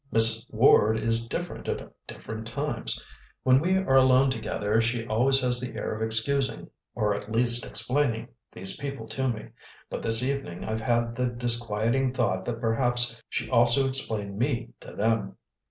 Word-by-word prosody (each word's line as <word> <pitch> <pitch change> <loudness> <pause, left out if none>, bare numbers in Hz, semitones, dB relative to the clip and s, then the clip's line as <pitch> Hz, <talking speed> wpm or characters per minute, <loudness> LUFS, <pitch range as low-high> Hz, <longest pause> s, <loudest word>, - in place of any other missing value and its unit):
Miss 115 +1 +4
Ward 110 -1 +4
is 115 +1 0
different 175 +8 -6
at - - -4 0.2
different 110 0 -8
times. 140 -1 -4 0.4
When 130 0 +4
we 185 +5 +1
are 185 -9 +2
alone 130 0 +4
together 110 -2 -1
she 115 0 -2
always 130 +5 +1
has 125 -1 +2
the 125 -2 -6
air 105 - -4
of 110 - -7
excusing, 115 +5 -1 0.2
or 105 -1 0
at 105 +1 -7
least 120 +1 +3
explaining, 115 +1 -1 0.2
these 95 0 -1
people 140 -5 -6
to 130 -1 -1
me, 110 -3 -6 0.4
but - - -5
this 115 +1 +4
evening 135 -10 -4
I've 110 0 -4
had 120 0 -1
the 125 +1 -1
disquieting 120 +1 -1
thought 95 -5 -1
that 115 -2 -4
perhaps 120 0 +4
she - - -3
also 120 +2 +4
explained 110 -7 -2
me 120 -2 -1
to - - -13
them." 105 -3 -1
115 Hz, 165 wpm, -26 LUFS, 110-130 Hz, 0.4 s, Miss